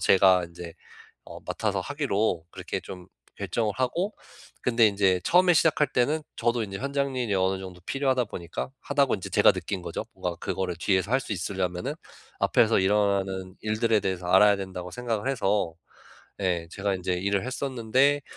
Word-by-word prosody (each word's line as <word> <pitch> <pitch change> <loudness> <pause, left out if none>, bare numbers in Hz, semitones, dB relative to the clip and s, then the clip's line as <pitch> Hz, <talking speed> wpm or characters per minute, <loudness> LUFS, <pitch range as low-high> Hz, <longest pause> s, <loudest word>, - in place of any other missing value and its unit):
제가 95 -2 +5
인제 85 0 -10 0.5
어 - - -10
맡아서 - - -2
하기로 100 -5 -1
그렇게 - - -5
좀 90 -1 -10 0.3
결정을 110 -3 -1
하고 170 +11 -1 0.5
근데 115 -2 +4
인제 95 -3 +2
처음에 180 0 +5
시작할 150 -1 +3
때는 150 +6 +1
저도 120 0 +1
인제 95 -1 -6
현장 140 0 -1
일이 115 -5 0
어느 95 0 +1
정도 90 -2 -9
필요하다 135 -3 +1
보니까 85 +6 -6
'하다.'고 140 -3 +2
인제 95 - -7
제가 - - +6
느낀 95 -2 -4
거죠. - - -4
뭔가 90 -1 -3
그거를 95 -3 -3
뒤에서 95 +2 +1
할 135 - +4
수 110 - -5
있으려면은 90 -1 -2 0.5
'앞에서 115 0 +4
일어나는 95 -2 +1
일들에 110 0 +1
대해서 95 -2 -3
알아야 100 +2 +6
된다.'고 90 -2 -6
생각을 125 0 -2
해서 100 -8 0 0.7
네 90 -4 -1
제가 100 0 -1
인제 90 0 -2
일을 100 +3 0
했었는데 130 +2 +1
100 Hz, 365 characters per minute, -26 LUFS, 95-125 Hz, 0.7 s, 제가